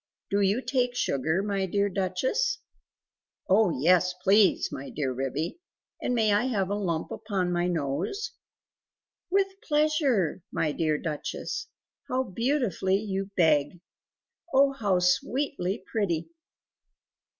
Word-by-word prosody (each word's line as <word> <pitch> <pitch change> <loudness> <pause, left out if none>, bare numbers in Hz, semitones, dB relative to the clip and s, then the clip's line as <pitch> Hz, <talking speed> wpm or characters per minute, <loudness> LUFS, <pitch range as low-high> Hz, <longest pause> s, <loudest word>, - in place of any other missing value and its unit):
Do 200 +1 +2
you 200 +6 +2
take 250 -2 0
sugar, 160 - 0
my 200 -2 -1
dear 200 +2 +1
Duchess?" 195 - 0 0.9
"Oh 200 +1 +4
yes, 180 +4 +3
please! 200 +1 +4
my 135 +1 -6
dear 135 -3 -2
Ribby; 140 - -3 0.4
and 250 - 0
may 220 -3 +3
I 210 +4 +2
have 200 -7 0
a - - +1
lump 170 -6 -2
upon 195 -5 -2
my 175 0 +1
nose?" 170 - -2 1.0
"With 390 +1 0
pleasure, 295 - +1
my 155 - 0
dear 155 0 0
Duchess; 165 - -4 0.4
how 260 +1 +1
beautifully 230 - 0
you 195 -2 -3
beg! 160 -1 +3 0.7
Oh, 275 +1 +5
how 205 -8 +1
sweetly 195 +2 0
pretty!" 175 -7 -1
195 Hz, 120 wpm, -27 LUFS, 175-250 Hz, 1.0 s, Oh